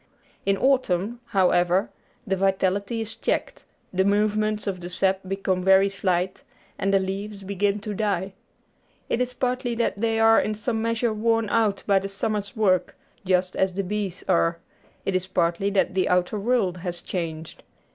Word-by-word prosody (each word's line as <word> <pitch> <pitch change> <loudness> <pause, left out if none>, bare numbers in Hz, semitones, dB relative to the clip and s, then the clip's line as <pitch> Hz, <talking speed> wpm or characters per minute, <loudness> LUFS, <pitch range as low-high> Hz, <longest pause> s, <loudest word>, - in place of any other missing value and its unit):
In 195 0 +3
autumn, 235 -4 +1
however, 180 -3 +2 0.3
the 195 -3 0
vitality 195 +3 0
is 225 0 -6
checked; - - -2 0.3
the 190 +1 +2
movements 210 +1 +1
of 195 -3 -2
the 175 - -6
sap 190 +1 +1
become 190 -1 -1
very 190 +1 +5
slight; 185 -2 -1 0.4
and 195 - +1
the 195 - +5
leaves 195 +1 -4
begin 200 +1 0
to 210 0 -4
die. 195 -2 -1 0.8
It 240 - 0
is 250 0 -2
partly 250 -1 -1
that 230 -3 0
they 225 +1 0
are 225 0 +6
in 215 - -2
some 220 +1 -2
measure 230 0 0
worn 225 0 +1
out 215 -4 +1
by 200 -1 +4
the 195 +1 -5
summer's 200 0 -3
work, 185 -5 +1 0.3
just 185 0 +1
as 190 -1 +1
the 195 - -1
bees 200 -1 -3
are; 170 -2 +2 0.5
it 195 - 0
is 185 0 0
partly 175 +1 +1
that 200 -2 +1
the 185 -1 +1
outer 180 +3 +1
world 205 -5 +1
has 175 -1 -5
changed. 165 -3 -5
195 Hz, 165 wpm, -25 LUFS, 185-215 Hz, 0.8 s, are